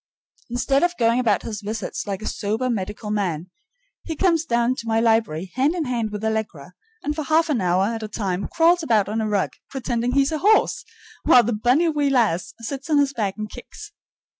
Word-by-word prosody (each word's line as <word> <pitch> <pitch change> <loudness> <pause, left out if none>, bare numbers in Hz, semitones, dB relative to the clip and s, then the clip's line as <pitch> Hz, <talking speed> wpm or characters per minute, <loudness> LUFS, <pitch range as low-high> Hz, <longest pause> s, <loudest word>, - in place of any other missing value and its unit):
Instead 265 +3 +1
of 350 0 +1
going 230 0 +3
about 215 -6 +1
his 215 -2 -5
visits 210 +1 -4
like 200 +1 -4
a - - -3
sober 220 +5 -1
medical 210 0 -4
man, 185 -5 -2 0.5
he 325 - -5
comes 335 -1 +2
down 235 -2 +1
to 230 -3 -8
my 225 0 +2
library 220 -7 +1
hand 275 +6 +1
in 335 -4 -1
hand 235 -4 -1
with 210 0 -6
Allegra, 210 -8 -3 0.3
and 295 +1 -2
for 310 - -2
half 315 +2 +2
an 245 -8 +1
hour 180 +1 +2
at 225 +1 -3
a 215 - -4
time 200 -3 -3
crawls 340 +1 +3
about 220 -10 +2
on 220 +2 -1
a 215 - -1
rug, 205 -2 0 0.2
pretending 245 -2 -2
he's 275 +1 +3
a 310 - -2
horse, 425 +5 +3 0.4
while 245 - +6
the 240 - -1
bonnie 250 +10 +2
wee 295 -2 +1
lassie 225 -10 +1
sits 270 +6 -6
on 300 - +3
his 280 -1 +2
back 205 -6 -2
and 215 0 -5
kicks. - - -11
230 Hz, 210 wpm, -22 LUFS, 210-275 Hz, 0.5 s, while